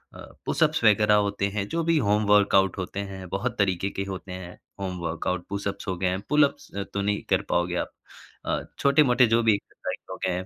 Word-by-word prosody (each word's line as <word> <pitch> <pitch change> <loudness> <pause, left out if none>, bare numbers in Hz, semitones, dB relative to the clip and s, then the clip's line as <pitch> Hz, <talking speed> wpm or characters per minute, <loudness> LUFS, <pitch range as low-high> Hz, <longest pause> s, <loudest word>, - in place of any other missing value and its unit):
अ, - - -11 0.3
pushups - - +1
वगैरह 105 0 +5
होते 100 -1 +1
हैं, 100 0 -3
जो 165 0 -1
भी 165 0 +2
होम 105 -3 +2
वर्कआउट 100 -2 +4
होते 95 +1 -4
हैं। 95 -1 -8
बहुत 120 +6 -2
तरीके 95 -1 +1
के 95 - -3
होते 95 -1 -7
हैं, 90 -1 -8 0.2
होम 95 -2 -3
वर्कआउट। 90 +2 -2
पुशअप्स 100 0 -4
हो 95 -2 -2
गए, 95 0 0
पुलअप्स 150 -1 +2 0.2
तो 100 - -1
नहीं 105 +1 0
कर - - +3
पाओगे 85 0 +1
आप। - - -2 0.5
अ, - - 0 0.2
छोटे-मोटे 140 -3 +5
जो 115 +1 +3
भी 110 -1 +5
एक्सरसाइज़ 100 - -6
हो - - -5
गए 95 - +1
हैं, 90 +1 -3
100 Hz, 200 wpm, -26 LUFS, 95-110 Hz, 0.5 s, वगैरह